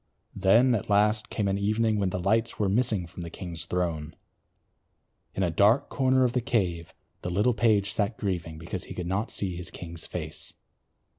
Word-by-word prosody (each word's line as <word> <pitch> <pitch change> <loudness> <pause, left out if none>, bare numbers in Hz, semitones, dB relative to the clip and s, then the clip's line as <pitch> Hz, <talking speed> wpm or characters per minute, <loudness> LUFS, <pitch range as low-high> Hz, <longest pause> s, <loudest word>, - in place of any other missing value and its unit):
Then 115 +7 +5
at 105 -3 -2
last 105 +1 +3
came 105 -3 -1
an 100 0 0
evening 110 +1 +1
when 100 -2 +1
the 90 - -3
lights 110 +5 +1
were 105 - +1
missing 105 -2 +2
from 90 +1 -10
the 85 - -5
king's 85 -2 -6
throne. 85 -3 -2 1.2
In 95 - 0
a 85 - +1
dark 105 - +4
corner 130 -1 +3
of 125 -2 +1
the 125 - +1
cave 95 -10 -1 0.3
the 90 - -3
little 105 +7 +2
page 105 -3 +2
sat 105 +1 -1
grieving 85 -6 -3
because 85 +3 -5
he - - -8
could 90 - -4
not 100 +5 -1
see 95 -3 -3
his 90 +1 -4
king's 85 -1 -7
face. - - -5
100 Hz, 190 wpm, -27 LUFS, 90-110 Hz, 1.2 s, Then